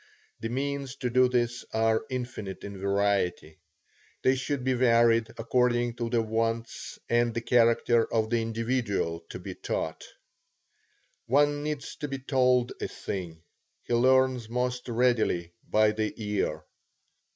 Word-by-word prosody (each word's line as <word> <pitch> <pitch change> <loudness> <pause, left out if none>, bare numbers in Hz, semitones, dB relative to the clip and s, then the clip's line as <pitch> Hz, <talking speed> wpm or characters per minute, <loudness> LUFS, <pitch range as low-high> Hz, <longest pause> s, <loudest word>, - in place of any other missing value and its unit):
The 115 - -4
means 140 +1 -3
to 125 -3 -3
do 130 +1 +4
this 120 -1 0
are 110 0 +2
infinite 120 -7 -5
in 100 -1 -7
variety. 100 -4 0 0.6
They 130 - +5
should 130 +1 -2
be 130 0 +2
varied 115 -2 +4
according 120 0 +1
to 120 -1 -2
the 115 -1 +1
wants 115 +1 -2
and 120 -1 +2
the 115 - -1
character 115 -1 +3
of 110 0 0
the 120 -1 +2
individual 115 -6 -1
to - - -6
be - - -7
taught. 80 - -4 1.2
One 145 +3 +3
needs 150 -1 -4
to 150 - -4
be 135 -1 -4
told 125 -2 +2
a - - -1
thing; 85 -4 -6 0.4
he - - -3
learns 130 -1 +3
most 125 +1 -2
readily 115 -8 +1 0.2
by 110 0 +4
the 110 0 -1
ear. 105 -2 -2
120 Hz, 140 wpm, -28 LUFS, 110-125 Hz, 1.2 s, They